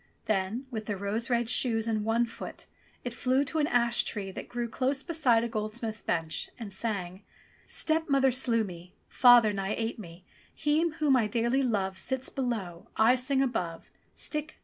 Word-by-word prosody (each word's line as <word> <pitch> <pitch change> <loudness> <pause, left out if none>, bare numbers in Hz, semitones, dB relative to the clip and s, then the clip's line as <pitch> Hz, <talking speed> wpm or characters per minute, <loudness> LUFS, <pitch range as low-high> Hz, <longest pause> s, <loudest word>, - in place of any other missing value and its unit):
Then 215 +5 -1
with 220 -2 -5
the 205 -2 -2
rose 205 +5 -2
red 240 -1 +1
shoes 230 -2 +1
in 215 -2 0
one 225 +2 +2
foot 230 - -9 0.4
it 245 - -4
flew 255 +3 +2
to 315 +3 -2
an 295 - +2
ash 235 -3 +3
tree 195 -3 -4
that - - -8
grew 240 -1 -2
close 265 +4 -1
beside 275 -9 +2
a - - 0
gold 215 -1 -3
smith's 225 -2 -4
bench, 165 -2 -2
and 215 -5 -7
sang: 190 -3 -3 0.4
"Stepmother 285 -4 +2
slew 235 -3 +2
me, 180 -1 -9
Father 240 -4 +6
nigh 195 +1 -2
ate 225 0 -3
me, 175 -2 -11 0.3
He 310 +3 +2
whom 300 -3 +2
I 230 -4 +3
dearly 235 +4 +1
love 195 -7 0
Sits 265 +3 -2
below, 215 -10 -3
I 225 +3 +6
sing 265 +2 +1
above, 180 -10 -3 0.2
Stick! 300 0 -4
230 Hz, 175 wpm, -29 LUFS, 210-260 Hz, 0.4 s, Father